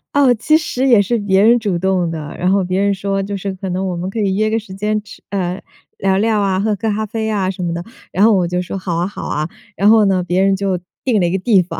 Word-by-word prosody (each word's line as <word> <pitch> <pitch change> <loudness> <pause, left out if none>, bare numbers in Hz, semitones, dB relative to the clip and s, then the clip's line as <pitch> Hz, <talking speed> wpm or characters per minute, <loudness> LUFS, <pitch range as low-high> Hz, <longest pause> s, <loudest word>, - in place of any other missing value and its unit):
哦， 275 -3 +5
其 310 +8 +3
实 270 -4 -1
也 235 -5 +6
是 230 +4 0
别 195 -2 +2
人 235 +2 +5
主 205 -6 -1
动 185 -1 0
的。 155 -3 -6
然 180 +1 +1
后 195 0 +2
别 185 +1 -1
人 200 0 +2
说， 195 0 -2
就 200 +1 -4
是： 195 0 -4
“可 190 0 -5
能 185 +2 -2
我 180 - -2
们 175 +2 -4
可 220 - -4
以 195 -2 +1
约 215 +1 +1
个 225 - +1
时 200 -4 -11
间 210 +2 -1
吃 - - -14
呃， 185 -1 -2 0.4
聊 190 -1 +1
聊 215 +1 +2
啊、 190 -1 +1
喝 210 +1 +1
个 220 +3 -2
咖 215 +1 -1
啡 220 +1 -3
呀 205 -4 0
什 185 -1 -6
么 170 -1 -1
的。” 170 - -4 0.3
然 195 - +2
后 225 - +5
我 180 -3 +2
就 180 +1 -1
说： 180 - -5
“好 185 -3 -3
啊， 175 +2 0
好 200 - -8
啊。” 155 +2 -2 0.3
然 200 +3 +3
后 220 -1 +6
呢， 185 -2 +2
别 180 +1 0
人 195 0 +3
就 190 -2 -1 0.2
定 240 -5 +2
了 - - +2
一 170 - -1
个 190 - +1
地 195 -1 +3
方， 180 - -6
195 Hz, 310 characters per minute, -17 LUFS, 185-215 Hz, 0.4 s, 也